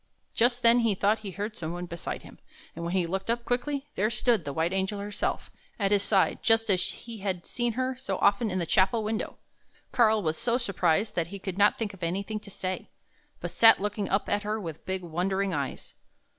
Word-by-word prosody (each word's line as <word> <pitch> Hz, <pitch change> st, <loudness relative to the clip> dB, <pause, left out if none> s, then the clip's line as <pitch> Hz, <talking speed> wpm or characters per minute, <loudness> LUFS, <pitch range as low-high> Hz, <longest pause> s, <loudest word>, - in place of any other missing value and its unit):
Just 245 Hz, +1 st, +2 dB
then 235 Hz, +1 st, +7 dB
he 225 Hz, -4 st, +2 dB
thought 205 Hz, +3 st, +2 dB
he 210 Hz, -, -6 dB
heard 205 Hz, +4 st, -4 dB
some 165 Hz, 0 st, -4 dB
one 175 Hz, 0 st, -4 dB
beside 170 Hz, -1 st, -6 dB
him, -, -, -14 dB, 0.4 s
and 170 Hz, -, -6 dB
when 170 Hz, +2 st, -2 dB
he 180 Hz, -2 st, +2 dB
looked 190 Hz, +5 st, -3 dB
up 235 Hz, 0 st, 0 dB
quickly, 275 Hz, +3 st, -1 dB
there 210 Hz, +3 st, +1 dB
stood 225 Hz, -4 st, +1 dB
the 140 Hz, -, -3 dB
white 160 Hz, +5 st, 0 dB
Angel 190 Hz, +2 st, -1 dB
herself 205 Hz, +1 st, -3 dB, 0.3 s
at 200 Hz, -2 st, 0 dB
his 205 Hz, -1 st, +4 dB
side, 200 Hz, -1 st, +2 dB
just 225 Hz, -2 st, +3 dB
as 185 Hz, -2 st, +3 dB
he 230 Hz, -2 st, -7 dB
had 190 Hz, -3 st, -3 dB
seen 240 Hz, -1 st, -1 dB
her 255 Hz, +2 st, -1 dB
so 195 Hz, -7 st, -3 dB
often 205 Hz, +3 st, +3 dB
in 185 Hz, -, -2 dB
the 175 Hz, -, 0 dB
chapel 190 Hz, +6 st, +3 dB
window! 215 Hz, +1 st, -3 dB, 0.5 s
Karl 220 Hz, -4 st, +4 dB
was 155 Hz, -1 st, -1 dB
so 240 Hz, 0 st, +1 dB
surprised 200 Hz, -3 st, +1 dB
that 170 Hz, -4 st, -1 dB
he 200 Hz, +3 st, -7 dB
could 190 Hz, -1 st, -5 dB
not 205 Hz, -, +5 dB
think 215 Hz, -3 st, -3 dB
of 195 Hz, -, -14 dB
anything 200 Hz, +5 st, -2 dB
to 205 Hz, -, -13 dB
say, 185 Hz, -1 st, -4 dB, 0.5 s
but -, -, -4 dB
sat 225 Hz, -1 st, +7 dB
looking 205 Hz, 0 st, -2 dB
up 195 Hz, -, +1 dB
at 205 Hz, -, +1 dB
her 215 Hz, +1 st, -2 dB
with 165 Hz, -5 st, -7 dB
big, 190 Hz, -1 st, -2 dB
wondering 190 Hz, +3 st, -1 dB
eyes. 140 Hz, -3 st, -4 dB
200 Hz, 220 wpm, -28 LUFS, 185-225 Hz, 0.5 s, then